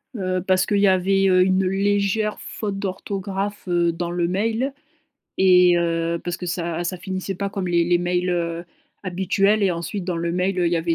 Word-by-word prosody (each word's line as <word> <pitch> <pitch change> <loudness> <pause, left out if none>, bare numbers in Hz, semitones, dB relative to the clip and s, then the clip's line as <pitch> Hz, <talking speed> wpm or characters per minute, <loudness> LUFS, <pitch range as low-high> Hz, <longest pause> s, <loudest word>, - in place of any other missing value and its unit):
Heu, 185 -3 -1
parce 185 0 +3
qu'il 205 - 0
y 200 - +4
avait, 195 +1 +3
heu, 185 -1 +4
une 190 +1 +2
légère 200 +2 0
faute 205 -3 -5
d'orthographe, 195 +1 -4
heu, 175 -1 +2
dans 170 +1 -4
le 175 -1 0
mail 225 +8 -1 0.6
et 180 -2 +5
heu, 170 0 0
parce 175 -1 -3
que 180 - -7
ça 170 -1 -2
ça 185 +2 -2
finissait 190 +2 -4
pas 200 +2 -3
comme 195 -2 -3
les 170 -1 +2
les 175 0 +2
mails, 180 +1 0
heu, 170 -1 -2 0.4
habituels 195 +3 +1
et 190 - +3
ensuite, 175 +3 -4
dans 180 -2 -2
le 170 0 -2
mail, 180 +2 0
heu, 175 - +2
il 170 - 0
y - - +3
avait 165 0 0
185 Hz, 205 wpm, -22 LUFS, 175-195 Hz, 0.6 s, et